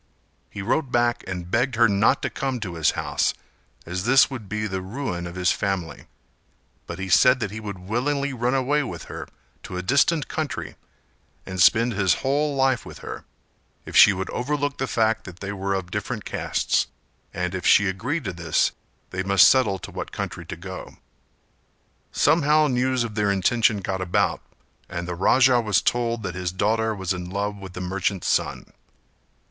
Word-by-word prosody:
He 100 - -7
wrote 130 +5 0
back 120 -1 +1
and 90 -2 -5
begged 125 +2 +1
her 115 0 +5
not 100 +1 +2
to - - -1
come 135 -2 -2
to 90 -5 -4
his 80 -2 +2
house - - 0 0.5
as 90 +2 -4
this 135 +5 +5
would 115 -7 -7
be 105 +1 -2
the 95 -3 -3
ruin 95 -4 -4
of 85 - -9
his 90 -1 +2
family; 90 -6 -3 0.8
but 85 - -6
he 95 0 -4
said 125 +8 +5
that 105 -5 -3
he 110 - -6
would 105 -3 -6
willingly 135 +9 -1
run 125 +1 0
away 140 +3 +2
with 130 - -6
her - - -8 0.3
to 90 - -7
a 90 - -3
distant 140 - +2
country, 155 -3 -4 0.7
and 95 -1 -3
spend 115 +5 +5
his 95 -3 +2
whole 145 +2 +1
life 135 -2 +2
with - - -10
her, - - -7 0.6
if - - -8
she - - +9
would 95 -1 -4
overlook 145 +2 -2
the 135 - -1
fact 110 -2 +1
that 90 -1 -10
they 100 0 -5
were 100 0 -2
of 90 -2 -4
different - - -4
castes; - - 0 0.4
and 90 0 -3
if 95 -1 -4
she 100 - +5
agreed 125 - -2
to 95 -5 -4
this 85 0 +1 0.4
they 95 - -2
must 100 -1 +6
settle 130 -7 +3
to - - -9
what - - -6
country - - -5
to - - -5
go. 95 +2 -9 1.1
Somehow 155 -1 +3
news 130 -2 +1
of 115 -2 -5
their 105 -1 +1
intention 105 +2 +2
got 95 0 -3
about, 90 -1 0 0.5
and 85 0 -5
the 90 - -3
Raja 125 +7 +4
was 105 -3 +2
told 120 -2 0
that 95 -2 -3
his 90 0 -3
daughter 110 +4 0
was 95 -2 -2
in 90 -1 -6
love 100 +2 -2
with 95 -2 -10
the 90 - -6
merchant's 95 +1 -2
son. - - -1
105 Hz, 185 wpm, -24 LUFS, 95-125 Hz, 1.1 s, she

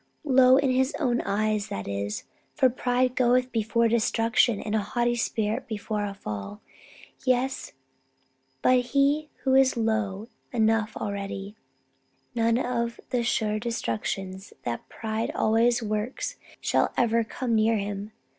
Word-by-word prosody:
Low 260 -2 +6
in 275 -2 +2
his 260 +3 +1
own 245 -6 +1
eyes, 215 0 0
that 100 - -5
is. 100 +1 -3 0.3
For 260 -4 +4
pride 250 +1 +1
goeth 250 0 +3
before 230 0 +2
destruction, 230 -1 +2
and 210 - -4
a 220 - +3
haughty 240 +3 0
spirit 230 +1 -1
before 210 -1 -3
a 200 -1 -5
fall. 105 - -6 0.6
Yes; 255 +1 0 0.9
but 255 0 +5
he 280 +4 +1
who 265 - +2
is 265 -1 +4
low 220 -2 -1 0.2
enough 225 -2 +1
already 200 0 -4 0.8
none 230 -1 +2
of 235 -2 -1
the 245 - +1
sure 215 -2 0
destructions 190 - -3
that 120 -1 -4
pride 220 0 -3
always 235 +2 +3
works 215 +3 -3 0.2
shall - - +1
ever 230 -1 +3
come 235 +2 -3
near 220 +1 +3
to 210 - 0
him. 205 +1 -5
230 Hz, 135 wpm, -26 LUFS, 210-250 Hz, 0.9 s, Low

